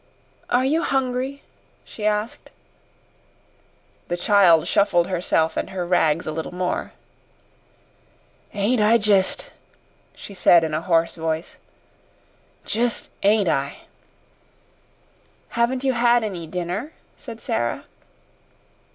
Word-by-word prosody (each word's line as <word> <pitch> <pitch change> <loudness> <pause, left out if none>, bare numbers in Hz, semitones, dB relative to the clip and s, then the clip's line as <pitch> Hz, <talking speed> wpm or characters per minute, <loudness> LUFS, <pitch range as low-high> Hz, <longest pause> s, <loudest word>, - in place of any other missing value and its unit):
"Are 250 +1 +2
you 310 +5 +1
hungry?" 265 0 -2 0.4
she 210 -1 -4
asked. 210 +2 -2 1.6
The 175 - -2
child 175 -4 +4
shuffled 175 -4 +2
herself 170 -3 0
and - - -3
her 185 -2 -4
rags 165 -3 +1
a - - -3
little 160 +1 -5
more. 180 0 -3 1.6
"Ain't 210 +4 0
I 220 +2 +5
jist?" 205 -3 +2 0.6
she 200 - -10
said 175 -2 +5
in 160 -1 -2
a 155 - -1
hoarse 165 -2 +1
voice. 160 0 -3 1.1
"Jist 235 +1 0
ain't 205 -1 +3
I?" 140 -3 -1 1.7
"Haven't 245 +3 0
you 265 -1 +1
had 240 0 +3
any 180 -6 -5
dinner?" 180 - -4 0.2
said 230 -5 -10
Sara. 120 - -2
200 Hz, 110 wpm, -22 LUFS, 170-235 Hz, 1.7 s, I